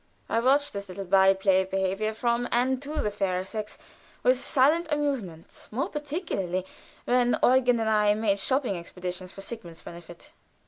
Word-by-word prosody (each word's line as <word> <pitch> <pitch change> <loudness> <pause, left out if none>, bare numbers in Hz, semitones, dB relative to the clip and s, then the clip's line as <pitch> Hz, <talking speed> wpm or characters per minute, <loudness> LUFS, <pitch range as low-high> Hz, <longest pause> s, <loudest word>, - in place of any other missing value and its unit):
I - - -1
often 230 - 0
watched 285 +2 +3
this 200 -1 -6
little 195 +2 -6
by 190 +1 +5
play 190 -1 +3
of 190 - -6
behavior 195 +3 -1
from 240 +1 0
and 255 +2 +1
to 300 +2 -3
the 210 - -1
fairer 190 -2 -1
sex 215 +1 -5 0.5
with 255 +1 +3
silent 315 +4 +2
amusement, 265 - -3
more 255 +6 -2
particularly 290 - -3 0.4
when 245 0 +2
Eugen 250 -2 +4
and 225 - -1
I 210 -1 +3
made 210 -2 +1
shopping 260 -1 +1
expeditious 180 +1 -6
for 195 - -10
Sigmund's 195 -6 -8
benefit. 170 -1 -12
215 Hz, 170 wpm, -27 LUFS, 190-255 Hz, 0.5 s, by